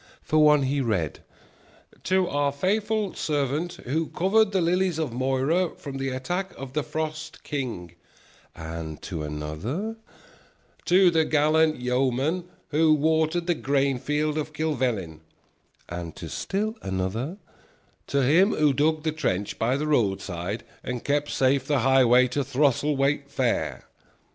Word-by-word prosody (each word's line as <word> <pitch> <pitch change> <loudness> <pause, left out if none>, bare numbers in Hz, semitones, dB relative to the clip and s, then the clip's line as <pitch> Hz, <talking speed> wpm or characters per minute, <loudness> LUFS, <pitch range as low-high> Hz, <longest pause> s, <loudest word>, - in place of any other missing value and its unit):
For 155 - +2
one 150 -2 +5
he 140 +1 0
read: 95 - -1 0.9
"To 185 -1 +2
our 145 -2 +1
faithful 205 +6 0
servant 150 +3 -1
who 155 +6 -1
covered 200 +4 +2
the 195 - +1
lilies 180 0 +1
of 155 -7 -2
Moira 135 +8 0
from 140 -2 -7
the 135 0 -1
attack 175 +10 -3
of 135 -1 -8
the 150 - +1
Frost 155 +1 -5
King"; 120 - -4 0.6
and 80 -1 -6
to 85 -5 -4
another: 80 - -4 0.9
"To 180 +2 +5
the 160 -1 +3
gallant 155 0 +3
yeoman 130 +7 0 0.2
who 155 +1 +4
watered 160 +3 +1
the 175 - +2
grain 140 -3 0
field 150 +2 -1
of 155 0 -5
Kilvellin"; 125 - -1 0.7
and 85 -2 -6
to - - -8
still 215 +4 -2
another: 95 - -3 0.7
"To 140 -1 +1
him 175 - +4
who 150 -2 +3
dug 155 +2 +1
the 160 - 0
trench 105 - -2
by 125 +4 +1
the 150 - -2
roadside 100 - -1 0.2
and 125 -1 -4
kept 145 0 0
safe 135 0 +1
the 145 -4 +2
highway 125 -1 +5
to 140 +3 -1
Throselwait 140 +1 +1
Fair." 130 -4 -1
145 Hz, 140 wpm, -25 LUFS, 125-160 Hz, 0.9 s, one